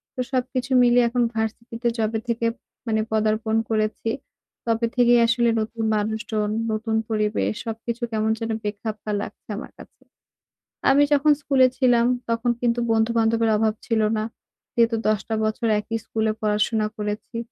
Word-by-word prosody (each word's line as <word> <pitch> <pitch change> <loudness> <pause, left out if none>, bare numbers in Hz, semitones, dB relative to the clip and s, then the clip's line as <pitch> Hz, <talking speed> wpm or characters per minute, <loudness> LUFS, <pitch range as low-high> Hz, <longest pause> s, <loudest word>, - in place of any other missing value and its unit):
তো - - -9
সবকিছু 255 0 -2
মিলিয়ে 245 0 +5
এখন 245 0 +1
ভার্সিটিতে 230 +2 -3
যবে 220 0 0
থেকে 235 0 -1 0.4
মানে 220 -1 +1
পদার্পণ 220 0 +1 0.2
করেছি, 215 +1 0 0.6
তবে 230 +1 +2
থেকেই 240 -1 +5
আসলে 235 0 +2
নতুন 225 +1 -4
মানুষজন, 215 0 -1 0.2
নতুন 220 +1 -1
পরিবেশ। 215 0 0
সবকিছু 230 +1 -4
কেমন 220 0 +1
যেন 225 0 -3
বেখাপ্পা 210 +1 -4
লাগছে - - -9
আমার - - -8
কাছে। - - -15 0.9
আমি 280 +2 +6
যখন 295 +1 +4
স্কুলে 265 -3 +4
ছিলাম 245 -3 +4 0.2
তখন 230 +1 +1
কিন্তু 240 0 +1
বন্ধু-বান্ধবের 225 0 +2
অভাব 220 0 +2
ছিল 225 -2 +1 0.2
না। 215 - -1 0.5
যেহেতু 230 -1 +3
১০ 215 -1 +2
টা 220 - 0
বছর 220 +2 -1
একই 225 +2 -3
স্কুলে 220 -1 0
পড়াশোনা 215 +1 +1
করেছি, 210 +2 -4
225 Hz, 145 wpm, -23 LUFS, 215-235 Hz, 0.9 s, আমি